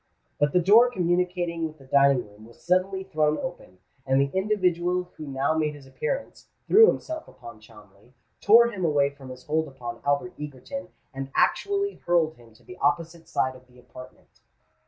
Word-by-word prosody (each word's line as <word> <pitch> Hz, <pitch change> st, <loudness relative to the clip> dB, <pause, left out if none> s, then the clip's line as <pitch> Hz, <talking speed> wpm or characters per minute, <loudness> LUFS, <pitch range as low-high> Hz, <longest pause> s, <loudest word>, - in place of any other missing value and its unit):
But 145 Hz, 0 st, +2 dB
the 180 Hz, -, +3 dB
door 215 Hz, +7 st, +6 dB
communicating 175 Hz, -4 st, -1 dB
with 155 Hz, 0 st, -13 dB
the 135 Hz, -, -17 dB
dining 140 Hz, -3 st, +3 dB
room 105 Hz, +2 st, -16 dB
was 115 Hz, -, -18 dB
suddenly 185 Hz, +2 st, 0 dB
thrown 155 Hz, -4 st, 0 dB
open, 175 Hz, -, -7 dB, 0.3 s
and 135 Hz, 0 st, +2 dB
the 140 Hz, 0 st, +1 dB
individual 180 Hz, -3 st, 0 dB
who 155 Hz, -, -8 dB
now 135 Hz, +3 st, 0 dB
made 155 Hz, -2 st, -1 dB
his 140 Hz, -2 st, -14 dB
appearance, -, -, -5 dB, 0.2 s
threw 445 Hz, +1 st, +7 dB
himself 315 Hz, -6 st, -2 dB
upon 115 Hz, -3 st, -13 dB
Cholmondeley, 105 Hz, +1 st, -19 dB, 0.3 s
tore 235 Hz, +3 st, +6 dB
him 190 Hz, -5 st, -5 dB
away 145 Hz, -3 st, +2 dB
from 140 Hz, -2 st, -13 dB
his 125 Hz, 0 st, -10 dB
hold 160 Hz, +1 st, 0 dB
upon 120 Hz, -4 st, -8 dB
Albert 145 Hz, +6 st, 0 dB
Egerton, 150 Hz, +6 st, -7 dB, 0.3 s
and 135 Hz, 0 st, -6 dB
actually 400 Hz, 0 st, 0 dB
hurled 170 Hz, -3 st, +2 dB
him 120 Hz, -5 st, -19 dB
to 120 Hz, -, -23 dB
the 185 Hz, -, -12 dB
opposite 165 Hz, +3 st, -1 dB
side 130 Hz, 0 st, -1 dB
of 130 Hz, 0 st, -17 dB
the 125 Hz, 0 st, -22 dB
apartment. 125 Hz, +1 st, -15 dB
155 Hz, 175 wpm, -25 LUFS, 130-180 Hz, 0.3 s, threw